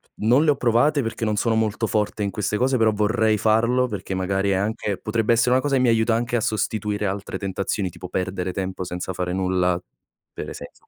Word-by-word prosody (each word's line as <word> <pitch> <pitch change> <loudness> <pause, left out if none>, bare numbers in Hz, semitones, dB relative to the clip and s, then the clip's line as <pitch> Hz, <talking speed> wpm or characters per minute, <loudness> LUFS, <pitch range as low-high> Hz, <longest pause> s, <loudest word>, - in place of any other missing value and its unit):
non 125 +8 +3
le 150 - +5
ho 145 - +1
provate 130 +5 +2
perché 115 -1 -3
non 105 -1 0
sono 110 +2 +1
molto 110 0 0
forte 105 0 -1
in 100 - -1
queste 105 +2 -2
cose, 130 +3 +2
però 110 -1 +3
vorrei 110 +1 +2
farlo 115 +4 +2
perché 105 -3 -5
magari 95 +1 0
è - - +3
anche 105 0 -1
potrebbe 115 +1 0
essere 120 +2 +2
una 130 - +5
cosa 140 0 0
che 130 - +3
mi 125 - +4
aiuta 115 0 +3
anche 120 +1 0
a - - -1
sostituire 105 -1 -1
altre 100 +1 -3
tentazioni, 95 0 -2
tipo 90 +1 -9
perdere 90 0 -3
tempo 95 -1 -4
senza 90 +1 -4
fare 90 -1 -3
nulla, 90 -1 +1 0.5
per - - -6
esempio - - -11
105 Hz, 215 wpm, -23 LUFS, 95-115 Hz, 0.5 s, le